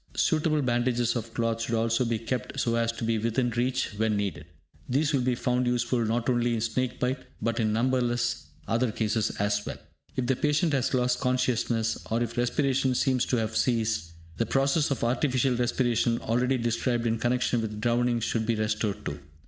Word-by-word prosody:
Suitable 155 -2 +2
bandages 120 -1 +1
of 115 -1 -4
cloth 115 0 -1
should 115 +1 -1
also 115 +2 +1
be 115 -1 0
kept 115 +1 -4
so 115 - +1
as 115 0 +1
to 115 0 -7
be 115 -1 +1
within 115 +2 0
reach 125 +3 0
when 110 -1 +1
needed. 95 -6 -3 0.4
These 145 +4 +1
will 135 - +2
be 125 0 +1
found 125 0 0
useful 120 0 +1
not 115 +2 -1
only 120 -1 +2
in 110 - -2
snake 120 +2 -1
bite, 125 +2 0 0.2
but 115 +1 -1
in 110 -2 +1
numberless 120 +1 0 0.2
other 115 +1 +1
cases 110 0 0
as 105 0 0
well. - - -6 0.4
If 130 - -1
the 130 +1 +2
patient 150 +3 +1
has 135 -1 +1
lost 125 -1 +1
consciousness, 125 -3 0
or 115 +2 +1
if 115 0 -5
respiration 130 +1 +1
seems 130 -1 +1
to 125 - +1
have 110 -1 -2
ceased, 110 -10 0 0.2
the 115 - 0
process 135 +3 +2
of 140 - -2
artificial 130 +1 +1
respiration 120 -1 +1
already 125 +4 +1
described 120 0 0
in 115 -1 0
connection 120 0 +1
with 105 -1 -4
drowning 120 +1 +1
should 110 -1 -1
be 115 - +2
resorted 110 -1 -1
to. 75 - -4
120 Hz, 190 wpm, -27 LUFS, 115-125 Hz, 0.4 s, Suitable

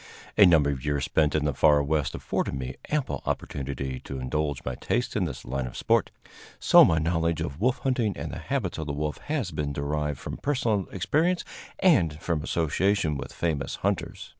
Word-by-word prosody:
A 100 - +8
number 75 -4 +4
of 65 -2 -5
years 75 -2 0
spent 75 -2 +2
in 75 -1 +1
the 75 - +1
far 75 +2 +4
West 75 -1 0
afforded - - -2
me 65 -1 -4 0.2
ample 150 -3 -1
opportunity 65 -1 -3
to 70 - -7
indulge 70 +2 -2
my 65 - -2
tastes 120 - -2
in 100 - +1
this 70 -7 -6
line 65 +1 -2
of - - -8
sport, - - +2 0.5
so - - +7
my 80 - +4
knowledge 85 0 0
of 70 +6 -4
wolf 125 +3 +2
hunting 120 -7 0
and - - -5
the - - -6
habits - - -2
of 80 - -4
the 70 - -2
wolf 75 +1 -3
has 145 - -2
been 75 -2 -3
derived 75 0 -2
from - - -6
personal 115 -9 0
experience 160 - +1 0.3
and 85 - +3
from 80 -3 -1
association 85 +2 +1
with - - -6
famous 80 -5 -2
hunters. - - -2
75 Hz, 190 wpm, -27 LUFS, 70-95 Hz, 0.5 s, A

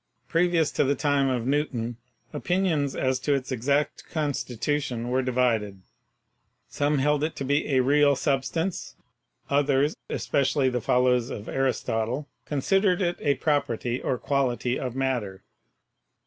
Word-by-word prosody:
Previous 165 -2 +2
to - - +1
the 140 +1 +1
time 140 -1 +1
of 125 -3 -1
Newton 130 -4 -1 0.4
opinions 175 -7 0
as 130 -1 0
to 140 +2 +1
its 135 0 -4
exact 140 +4 0
constitution 140 -4 -2
were 130 +1 +1
divided; 115 -6 0 0.8
some 145 +1 0
held 150 +2 +2
it 160 - -2
to - - -4
be 145 +2 0
a 130 - +5
real 145 +1 +4
substance, 150 +6 -2 0.5
others, 140 +1 +2
espe - - 0
cially 130 0 +2
the 125 -1 -1
followers 125 0 +2
of 105 - -7
Aristotle, 130 0 -1 0.2
considered 185 +6 +1
it 175 -2 0
a 140 -1 +1
property 130 -5 -1
or 125 - -1
quality 130 -2 0
of 125 -2 -4
matter. 120 -8 -2
135 Hz, 135 wpm, -26 LUFS, 125-145 Hz, 0.8 s, a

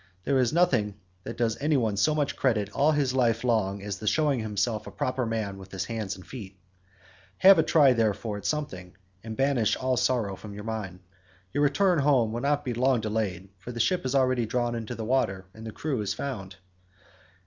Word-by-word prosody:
There 135 +3 +2
is 125 -2 +2
nothing 130 - +2 0.3
that - - -6
does 115 -1 0
any 150 0 +2
one 110 -5 0
so 150 +10 +2
much 145 -2 0
credit 105 -6 0
all 145 +8 +3
his 140 -3 +1
life 120 -3 +2
long 100 -5 0
as 100 -1 -4
the 110 - -6
showing 145 0 +2
himself 110 0 -2
a - - -7
proper 130 -1 -2
man 105 -4 -3
with 95 0 -12
his 95 - -3
hands 110 -4 -4
and 95 - -13
feet. 100 -7 -9 0.8
Have 190 -2 +7
a - - +7
try 150 -4 +5
therefore 110 -2 -1
at 100 - -10
something, 95 -13 -4 0.3
and 110 -1 -7
banish 135 -5 +2
all 130 -1 -1
sorrow 115 -7 +1
from 100 +1 -10
your 105 - -7
mind. 105 -5 -5 0.5
Your 145 - 0
return 170 +5 +3
home 135 -6 +3
will 120 +1 -3
not 145 +2 0
be 125 - -1
long 125 +1 +2
delayed, 105 -4 -2
for 120 - -8
the 120 - -6
ship 180 - +1
is 130 +1 -1
already 130 -3 +2
drawn 120 +1 -1
into 115 +1 -5
the 110 -1 -5
water, 95 -7 0
and 110 +2 -9
the - - -5
crew 130 +2 -3
is 100 - -2
found." 100 -9 -5
115 Hz, 210 wpm, -27 LUFS, 105-135 Hz, 0.8 s, Have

